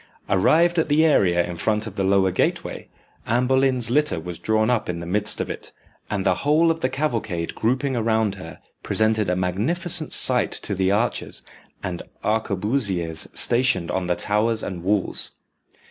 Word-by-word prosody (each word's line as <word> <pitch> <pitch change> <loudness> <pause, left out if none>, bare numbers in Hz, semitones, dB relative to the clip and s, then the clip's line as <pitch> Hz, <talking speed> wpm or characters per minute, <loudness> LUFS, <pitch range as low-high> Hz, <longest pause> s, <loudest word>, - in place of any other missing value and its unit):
Arrived 165 - +3
at 160 - +1
the 155 +2 +4
area 90 - +3
in 90 - -6
front 105 +5 0
of 110 - -7
the 100 - -1
lower 95 0 +3
gateway, 90 - -2 0.4
Anne 120 +2 +1
Boleyn's 130 -2 +1
litter 150 - +1
was 85 +1 -7
drawn 110 0 +1
up 120 -6 0
in 90 - -2
the 85 - -6
midst 105 +4 0
of - - -2
it, - - -7 0.4
and 100 -2 -2
the 95 - +4
whole 155 +3 +3
of 165 - -3
the 130 - 0
cavalcade 115 - -2
grouping 130 +4 -1
around 110 -3 +1
her, 95 -4 -10 0.2
presented 110 -2 +1
a 90 - +1
magnificent 155 - 0
sight 125 -1 +3
to 100 - -3
the 95 -1 0
archers 105 +5 -1 0.4
and 90 -2 -4 0.2
arquebusiers 100 - -1
stationed 120 -8 +2
on 95 -1 -2
the 90 - +1
towers 110 +3 0
and 90 -3 -5
walls. 100 +1 -1
110 Hz, 170 wpm, -23 LUFS, 95-130 Hz, 0.4 s, the